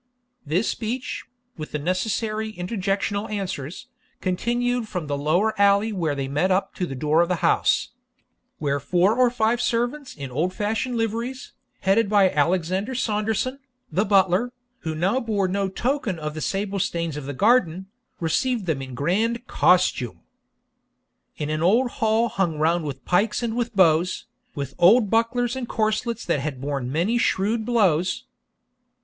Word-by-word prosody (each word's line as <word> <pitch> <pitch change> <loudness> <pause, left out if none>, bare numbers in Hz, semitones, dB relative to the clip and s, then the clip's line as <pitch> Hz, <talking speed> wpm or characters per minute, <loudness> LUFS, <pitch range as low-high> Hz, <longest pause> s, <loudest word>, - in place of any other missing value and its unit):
This 175 +9 +1
speech, 240 +3 -3 0.3
with 155 -1 -7
the - - 0
necessary 215 +6 -1
interjectional 200 +2 -2
answers, 185 -7 -4 0.3
continued 240 +5 -1
from 180 -6 -4
the 145 -1 -2
lower 170 +10 +1
alley 200 +2 +4
where 165 -6 -1
they 135 -1 -3
met 150 +7 +1
up 190 +1 +1
to 180 - -1
the 135 - -6
door 150 +5 +2
of 170 - +1
the 180 -3 0
house, - - +2 0.7
where 145 -2 -1
four 180 - +2
or 250 0 +4
five 235 0 +1
servants 245 +4 -1
in 140 -3 -7
old 170 +8 -1
fashioned 225 +4 -1
liveries, 230 +4 -3 0.3
headed 195 +3 +3
by 200 -3 +4
Alexander 185 - 0
Saunderson, 220 +3 -1 0.3
the 195 - +2
butler, 195 +3 +3 0.3
who 160 -1 -4
now 190 +10 +1
bore 210 -5 0
no 195 +1 -1
token 240 -2 -1
of 150 -1 -4
the 155 - -6
sable 200 +2 -2
stains 170 -5 -2
of 150 -2 -6
the - - -3
garden, 190 - +2 0.3
received 225 +7 0
them 155 -6 -1
in 130 -2 -7
grand 220 - 0
COSTUME, 155 - +2 1.2
In 150 0 -3
an 155 0 -1
old 235 +9 +3
hall 220 +1 +1
hung 180 -8 -1
round 165 +2 +1
with 135 -3 -6
pikes 205 +6 +1
and 230 -1 -1
with 235 -2 -2
bows, 175 -1 +3 0.3
With 140 -2 -4
old 210 +4 +5
bucklers 235 +2 +1
and 255 -2 -5
corslets 220 +1 -1
that 170 -4 +1
had 135 -2 -4
borne 135 -2 -3
many 185 - +1
shrewd 220 +2 0
blows. 185 -7 +2
195 Hz, 155 wpm, -24 LUFS, 160-225 Hz, 1.2 s, old